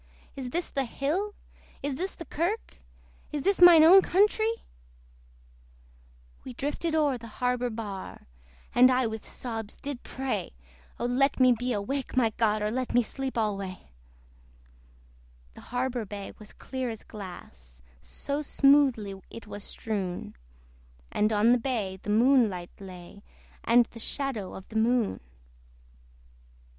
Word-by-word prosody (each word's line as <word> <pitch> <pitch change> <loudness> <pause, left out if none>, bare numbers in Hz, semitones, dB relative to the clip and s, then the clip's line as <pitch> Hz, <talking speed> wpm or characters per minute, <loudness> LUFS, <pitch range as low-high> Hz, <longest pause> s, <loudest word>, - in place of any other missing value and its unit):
Is 260 -2 -5
this 340 +6 -1
the 275 -1 0
hill? 335 - -2 0.5
is 285 0 -1
this 370 +8 -4
the 335 - -8
kirk? 350 +10 -2 0.5
Is 295 -2 -3
this 395 +1 +1
mine 345 -3 +10
own 370 +4 +9
countree! 435 +5 +2 1.8
We 255 - -8
drifted 295 +6 -2
o'er 290 -5 +2
the 230 - -10
harbour 250 0 0
bar, 210 -4 -7 0.5
And 250 +1 +7
I 255 0 +2
with 220 -1 -5
sobs 225 -4 -5
did 280 -3 -6
pray 255 - -4 0.4
O - - -1
let 265 +4 +2
me 255 -1 +6
be 245 +1 0
awake, 255 +6 -3
my 230 -3 +4
God! 215 -2 +2
Or 210 - 0
let 255 0 -2
me 245 - +5
sleep 265 +2 -4
alway. 195 - -3 1.6
The - - -13
harbour 245 -1 -1
bay 200 0 -7
was 215 -1 -11
clear 260 -2 -5
as 225 -2 -7
glass, 60 - -11 0.2
So 280 - -4
smoothly 270 -9 +3
it 230 - -10
was 205 -1 -7
strewn! 195 -6 -4 0.8
And 210 +1 +2
on 215 +2 +4
the 245 - +4
bay 220 -7 -2
the - - -7
moonlight 220 -6 +3
lay, 185 0 -11 0.4
And 235 +1 +5
the 230 - -13
shadow 230 -5 -3
of 190 - -10
the 220 - -4
moon. 230 -1 +2
245 Hz, 140 wpm, -28 LUFS, 210-275 Hz, 1.8 s, mine